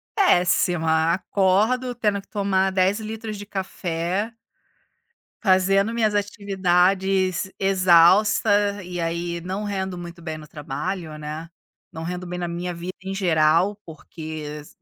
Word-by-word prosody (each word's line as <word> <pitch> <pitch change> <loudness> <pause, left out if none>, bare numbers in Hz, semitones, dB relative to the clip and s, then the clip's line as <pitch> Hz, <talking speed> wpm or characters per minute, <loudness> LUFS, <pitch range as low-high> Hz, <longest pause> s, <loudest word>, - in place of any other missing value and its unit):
Péssima, 170 - +3
acordo 210 +7 +1
tendo 210 -4 0
que - - -28
tomar 195 -2 +1
10 190 +2 +2
litros 220 -1 -6
de 205 - -8
café 190 +1 -3 1.1
fazendo 195 +2 +3
minhas 225 -2 +1
atividades 190 -2 +1
exausta, 195 +2 +4
e 175 -1 -5
aí, 170 +1 -2
não 190 +4 -4
rendo 190 -3 -3
muito 175 0 -9
bem 160 -2 -5
no 150 - -11
trabalho, 155 +3 -5
né, 155 +2 -6 0.4
não 160 -2 -7
rendo 180 +2 -5
bem 180 0 -5
na 175 - -3
minha 175 +1 -4
vida 175 +2 -6
em 190 - -5
geral, 170 +1 +3
porque 155 -1 -8 0.2
a 150 - -15
185 Hz, 130 wpm, -23 LUFS, 170-200 Hz, 1.1 s, exausta